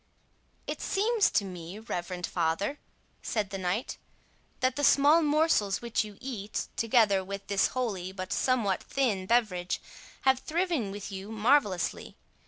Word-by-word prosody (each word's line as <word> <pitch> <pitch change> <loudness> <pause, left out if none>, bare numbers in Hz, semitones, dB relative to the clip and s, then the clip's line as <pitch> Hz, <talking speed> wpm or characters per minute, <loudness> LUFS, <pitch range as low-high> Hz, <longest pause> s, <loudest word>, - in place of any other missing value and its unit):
"It - - -5
seems 430 +2 +2
to 205 - +1
me, 180 0 -8
reverend 180 -5 -4
father," 175 - -1 0.4
said 210 -3 -2
the 195 - -4
knight, 185 +6 -2 0.6
"that 255 0 +1
the 290 - -2
small 290 +4 +6
morsels 300 - +2
which 235 -1 0
you 210 -2 -10
eat, 220 -6 -4
together 215 -4 +3
with 200 +1 -6
this 200 -1 +2
holy, 195 -8 -2
but 185 -1 -5
somewhat 230 -7 +1
thin 210 -9 -1
beverage, 195 -6 +1 0.4
have 265 -1 +3
thriven 330 - -1
with 200 +1 -7
you 195 +2 -7
marvellously. 220 - +1
210 Hz, 140 wpm, -29 LUFS, 190-260 Hz, 0.6 s, small